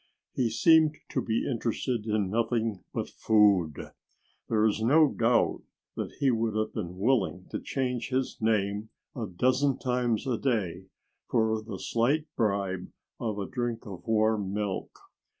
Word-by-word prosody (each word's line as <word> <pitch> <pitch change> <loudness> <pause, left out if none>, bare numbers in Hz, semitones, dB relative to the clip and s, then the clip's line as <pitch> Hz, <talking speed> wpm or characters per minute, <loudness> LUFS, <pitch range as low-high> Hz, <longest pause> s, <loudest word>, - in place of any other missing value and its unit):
He 125 -3 +1
seemed 155 +5 +4
to - - -1
be 115 -1 -1
interested 115 -1 -2
in 105 -3 0
nothing 115 -2 0
but - - -3
food. 100 -8 +2 0.6
There 110 -1 +3
is 110 0 +1
no 145 +6 +5
doubt 115 +1 +2 0.3
that - - -4
he 135 -2 +3
would 115 -2 0
have 110 0 -1
been 90 -4 -5
willing 100 -4 +1
to - - -2
change 125 -3 -2
his 130 0 -1
name 105 -1 0 0.3
a 115 -5 -3
dozen 130 +8 +1
times 125 -3 0
a 125 -4 -1
day 95 -8 -1 0.4
for 110 -2 +1
the 110 - -7
slight 140 +7 +1
bribe 100 -4 -1 0.3
of 110 -3 -2
a 100 - -2
drink 120 0 -3
of 95 -4 -8
warm 110 -3 +2
milk. 100 -2 -2
110 Hz, 150 wpm, -28 LUFS, 105-125 Hz, 0.6 s, no